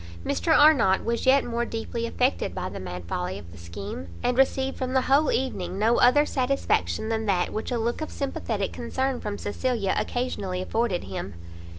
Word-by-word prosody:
Mr 85 -1 0
Arnott 275 -11 +5
was 235 +2 -1
yet 275 +1 +5
more 235 0 -1
deeply 230 0 -3
affected 250 +3 0
by 185 -1 -3
the - - -6
mad 90 -1 -6
folly 90 +2 -3
of 85 -4 -11
the 85 - -12
scheme, 85 +1 -7 0.2
and 245 - +1
received 265 0 +2
from 255 0 -3
the 260 - +4
whole 285 +3 +3
evening 220 -8 -2
no 225 +3 +3
other 290 +5 +6
satisfaction 250 - 0
than 220 -1 -1
that 185 -3 +1
which 215 - -3
a 245 - +1
look 235 +5 -1
of 310 - -3
sympathetic 225 -7 -3
concern 260 +2 -2
from 205 -1 -4
Cecilia 215 -2 -1
occasionally 205 -7 -2
afforded 210 0 -1
him. 95 0 -6
230 Hz, 185 wpm, -26 LUFS, 180-260 Hz, 0.2 s, other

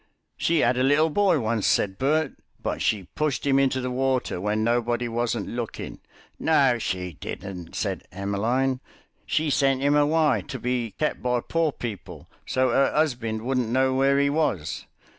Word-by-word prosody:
"She 165 -1 +1
'ad 125 +1 +2
a - - +1
little 150 +4 +3
boy 190 -2 +3
once," 110 -2 0
said 95 -1 +1
Bert, 150 +2 +1 0.3
"but - - -3
she 105 -3 +1
pushed 150 -3 -1
'im 135 -1 +3
into 135 -1 +2
the 125 0 -3
water 130 -7 0
when 105 +2 0
nobody 120 +1 +1
wasn't 120 -2 -1
looking." 120 -1 -5 0.4
"No 135 -6 +3
she 90 -4 -3
didn't," 90 -4 -7
said - - -3
Emmeline, 115 +7 0 0.5
"she 155 -1 +1
sent 135 -2 +2
'im 145 +1 +3
away 150 -5 +3
to - - -5
be 120 -4 -2
kep' 150 - -1
by 125 -1 +1
poor 165 +2 0
people, 115 -7 -7 0.2
so 130 0 +2
'er 135 +3 +3
'usbind 120 -8 0
wouldn't 125 -2 0
know 130 +2 +2
where 135 +1 +3
'e 140 0 +2
was. 120 - -1
130 Hz, 165 wpm, -25 LUFS, 115-140 Hz, 0.5 s, little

